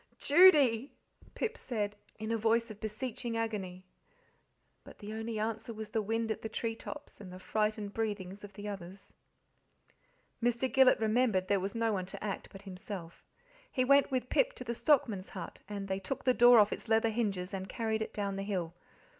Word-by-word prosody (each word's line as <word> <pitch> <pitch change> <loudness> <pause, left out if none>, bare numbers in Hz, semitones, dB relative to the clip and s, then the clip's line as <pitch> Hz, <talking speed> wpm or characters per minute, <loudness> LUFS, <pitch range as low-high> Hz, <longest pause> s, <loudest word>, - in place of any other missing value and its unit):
"Judy!" 285 -7 +5 0.4
Pip 465 0 -2
said, 210 -4 -2 0.2
in 220 +1 -4
a - - +2
voice 230 +1 +2
of 210 - -12
beseeching 230 +2 -4
agony. 190 -5 -3 1.0
But - - -13
the 210 0 -7
only 225 0 -4
answer 220 +1 -3
was 215 0 -6
the 220 0 0
wind 225 +2 -1
at - - -3
the 220 - -4
tree 225 +1 -2
tops 290 0 -9
and 185 -3 -9
the 185 - -8
frightened 210 +1 -1
breathings 205 -3 -3
of 205 -1 -10
the 205 +2 -7
others. 195 -1 -8 1.3
Mr. 240 +2 0
Gillet 265 -1 +6
remembered 220 -4 +2
there 200 -1 +3
was 195 +3 -4
no 230 -1 +1
one 185 -2 -2
to 190 - -7
act 205 -2 -4
but 195 0 -11
himself. 185 -3 -8 0.5
He 255 - +1
went 280 +1 +5
with 255 -2 -2
Pip - - +2
to - - -7
the 235 -1 -3
stockman's 230 - +2
hut; 180 -3 -8
and 200 -1 -4
they 190 0 -1
took 195 +8 -4
the 255 - +4
door 245 0 +7
off 210 -1 +5
its - - -7
leather 225 0 +3
hinges 200 -5 -2
and 190 0 -4
carried 220 -1 -1
it 220 - -3
down 200 -2 -3
the - - -2
hill. 185 -5 -3
220 Hz, 190 wpm, -32 LUFS, 200-235 Hz, 1.3 s, door